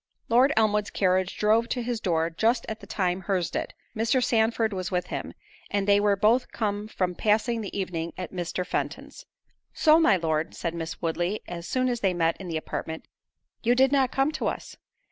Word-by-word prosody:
Lord 250 +5 +5
Elmwood's 210 -2 +2
carriage 185 -1 +1
drove 220 +2 +3
to 245 - -2
his 240 -1 -2
door 165 -2 +1
just 225 +8 +1
at 220 - -5
the - - -13
time 185 -2 -1
her's 185 -1 -1
did; - - -4 0.2
Mr. 230 +3 +2
Sandford 225 -2 +2
was 185 -1 -3
with 180 -1 -1
him, - - -5 0.3
and 200 -1 -1
they 200 0 +5
were 205 -1 +3
both 225 +5 +2
come 210 -2 -2
from 185 -4 -1
passing 220 +4 +1
the 200 -1 -5
evening 170 -3 -3
at 185 - -6
Mr. 180 0 -3
Fenton's. - - -4 0.5
"So, 315 0 +5
my 215 - +5
Lord," 160 -1 -1
said 170 - -3
Miss 165 0 -6
Woodley, 175 +5 -1
as 170 -1 -6
soon 255 0 +1
as 245 -1 -1
they 190 -4 +1
met 165 -1 +2
in 190 - -7
the 165 -2 -2
apartment, 160 0 -5 0.6
"you 240 +1 +3
did 265 +1 +4
not 270 -3 +3
come 270 +3 +1
to - - -2
us?" - - -4
205 Hz, 200 wpm, -26 LUFS, 175-230 Hz, 0.6 s, Lord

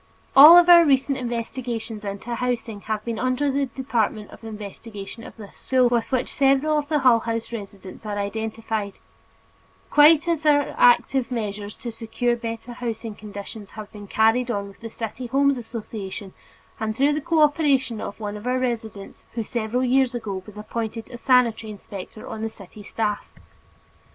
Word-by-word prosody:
All 305 +5 +11
of 350 0 +7
our 345 -1 +9
recent 275 -2 +2
investigations 235 -2 -4
into 200 +4 -5
housing 235 -3 -3
have 215 0 -3
been 230 -2 -3
under 255 +3 +1
the 275 0 0
department 230 -5 -2
of - - -14
investigation 215 0 -8
of - - -12
this 205 -3 -12
school 255 -2 +3
with 235 -2 0
which 255 -1 -1
several 280 +3 +3
of 290 - -5
the 305 - +2
Hull 250 -3 +6
House 230 +1 -4
residents 200 -3 -8
are 210 -1 -4
identified, 220 0 -3 1.0
quite 305 +2 +6
as 330 -2 0
our 290 -2 +3
active 245 +1 +4
measures 210 -4 -4
to 240 - -6
secure 235 +1 -1
better 230 +1 -6
housing 230 -2 -5
conditions 205 0 -9
have 215 -1 -8
been 205 -1 -10
carried 225 +4 +2
on 200 -3 -2
with 195 - -17
the 230 - -7
City 230 +3 -6
Homes 280 +2 +3
Association 210 -4 -7 0.5
and 220 0 -3
through 285 +2 +3
the 300 - -2
cooperation 290 -7 +2
of 200 - -6
one 210 -1 -4
of 210 +3 -7
our 255 +1 +1
residents 225 -5 -4
who 230 - -2
several 235 +2 -2
years 260 0 +2
ago 200 -5 -4
was 210 0 -12
appointed 220 +1 -5
a 240 - -7
sanitary 235 -3 +2
inspector 205 0 -9
on 220 -1 -6
the 225 - -2
city 210 -1 -13
staff. 210 +1 -2
230 Hz, 170 wpm, -23 LUFS, 215-255 Hz, 1.0 s, All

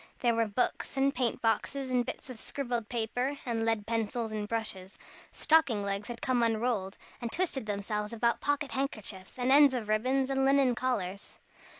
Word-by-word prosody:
There 240 -2 +3
were 230 -1 +2
books 230 +5 -1
and 275 +1 +3
paint 245 -3 -1
boxes 255 +4 0
and 250 -1 +3
bits - - -6
of 235 - -9
scribbled 240 -5 -3
paper, 245 +4 -1
and 230 -2 -1
lead 225 -2 0
pencils 225 0 -1
and 210 -1 -3
brushes. 210 -4 -4 0.3
Stocking 275 -10 +3
legs 200 +1 -2
had 240 -1 -7
come 255 -2 +2
unrolled, 225 -4 0 0.2
and 235 -1 -3
twisted 315 -10 -1
themselves 210 +1 -2
about 235 +1 +1
pocket 290 -2 0
handkerchiefs, 215 -7 -4
and 250 +1 +1
ends 285 -1 +7
of 220 -4 -3
ribbon, 255 +5 +2
and 270 0 +1
linen 270 -2 +4
collars. 205 -6 -3
235 Hz, 175 wpm, -30 LUFS, 215-260 Hz, 0.3 s, ends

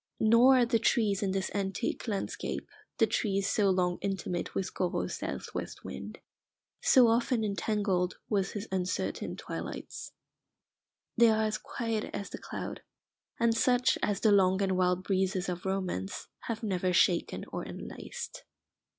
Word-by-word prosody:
Nor 235 +4 +6
are 245 - +5
the 230 -1 +2
trees 215 -4 +2
in 200 - 0
this 190 0 -1
antique 200 +5 -2
landscape 205 -3 -3 0.3
the 230 - +5
trees 200 -2 0
so 205 -2 +3
long 180 -1 +1
intimate 190 -3 -3
with 190 -1 -2
Corot's 180 -2 -1
south - - -5
west - - -5
wind, - - -7 0.6
so 250 -3 +6
often 230 0 +2
entangled 200 -3 0
with 195 -3 0
his 205 +1 -5
uncertain 185 -1 -2
twilights. - - -6 1.0
They 235 -1 +7
are 220 0 +3
as 215 0 0
quiet 225 -2 -3
as 200 -1 -5
the - - -6
cloud, - - -6 0.6
and 235 -1 +3
such 250 +1 +3
as 205 - 0
the 215 - +5
long 190 -1 +4
and 190 -1 +1
wild 180 0 +2
breezes 190 -1 0
of 180 +1 -3
Romance 185 - -2 0.2
have 230 -1 -3
never 185 -3 0
shaken 175 -1 +2
or - - -3
enlaced. - - -7
200 Hz, 150 wpm, -30 LUFS, 185-225 Hz, 1.0 s, They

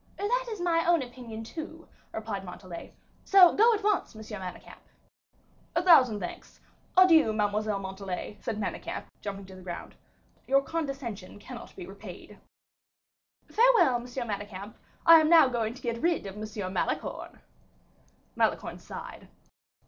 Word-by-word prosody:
"That - - 0
is 430 -3 -5
my 335 -1 +2
own 340 -5 +4
opinion, 240 -3 -8
too," 320 +6 -8 0.2
replied 215 -3 -4
Montalais; 180 -1 -9 0.3
"so, 370 -3 +7
go 455 +3 +5
at 415 - -6
once, 415 - 0
Monsieur 215 -1 -8
Manicamp." 185 -1 -9 1.0
"A 345 - +2
thousand 255 - +6
thanks. 180 - -8 0.4
Adieu 330 -10 +7
Mademoiselle 210 0 0
Montalais," 190 +1 -6
said 220 -2 -3
Manicamp, 205 - -4 0.2
jumping 200 -1 -6
to 190 0 -12
the 185 - -12
ground; 175 -1 -7 0.5
"your 275 +1 +4
condescension 270 - -5
cannot 205 - -10
be - - -8
repaid." - - -11 1.1
"Farewell, 460 - +5
M. 240 - -8
Manicamp; 205 -5 -5 0.3
I 330 -1 +10
am 310 0 +2
now 330 -4 +8
going 235 -2 -2
to - - -13
get 235 -1 -2
rid 340 -6 +1
of 195 - -6
M. 210 -3 -5
Malicorne." - - -3 1.0
Malicorne - - 0
sighed. - - -9
235 Hz, 140 wpm, -28 LUFS, 205-330 Hz, 1.1 s, I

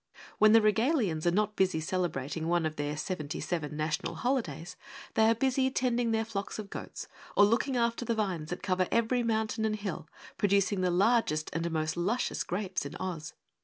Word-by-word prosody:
When 215 0 +7
the 225 - +8
Regalians 215 - +2
are - - +7
not 210 +4 +1
busy 190 -4 +2
celebrating 160 -2 -2
one 170 -1 +2
of 155 0 -2
their 145 0 -3
seventy 155 -2 -4
seven 155 -4 -3
national 155 0 -2
holidays, 205 - -2 0.4
they 220 0 +4
are 230 - +4
busy 265 +2 +2
tending 245 -2 0
their 225 0 +1
flocks 200 -3 -4
of 210 -2 -7
goats - - -7 0.3
or 205 - +8
looking 245 +5 +1
after 235 0 +1
the 235 -1 -1
vines 185 -8 -2
that 180 - -5
cover 185 -2 +1
every 235 +2 +2
mountain 220 -1 0
and 215 -1 +1
hill, 185 -6 -5 0.3
producing 200 -1 +2
the 180 - +2
largest 180 -4 +2
and 165 +2 -1
most 155 -1 -1
luscious 200 +9 -1
grapes 185 -1 -2
in 140 - -7
Oz. 170 -4 -5
195 Hz, 185 wpm, -30 LUFS, 165-225 Hz, 0.4 s, the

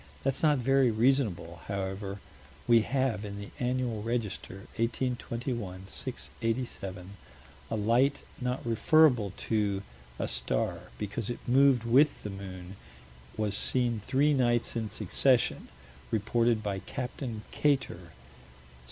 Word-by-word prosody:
That's 135 -1 +2
not 150 -2 +4
very 135 0 +3
reasonable: 110 -8 +1
however, 100 0 -4 0.5
we 115 -1 +6
have, 120 -3 0
in 100 -1 -6
the 100 0 -8
Annual 125 -3 -1
Register, 110 -3 -4
1821 115 -4 -2
687, 100 -5 -4 0.6
a - - -1
light 120 +6 +2 0.2
not 125 0 -2
referable 120 -1 +4
to 100 -3 0 0.3
a - - -2
star - - -2
because 105 +2 -4
it 120 - -3
moved 130 -1 +5
with 135 +6 +4
the 105 - -4
moon: 95 -1 -8 0.6
was 105 -2 0
seen 120 0 +2
three 140 +8 +2
nights 120 -4 +2
in 110 -2 -2
succession; 130 +2 +1 0.4
reported 115 +1 +1
by 100 -2 -2
Capt. 125 +7 -6 0.3
Kater. 130 - 0
115 Hz, 115 wpm, -30 LUFS, 100-125 Hz, 0.6 s, we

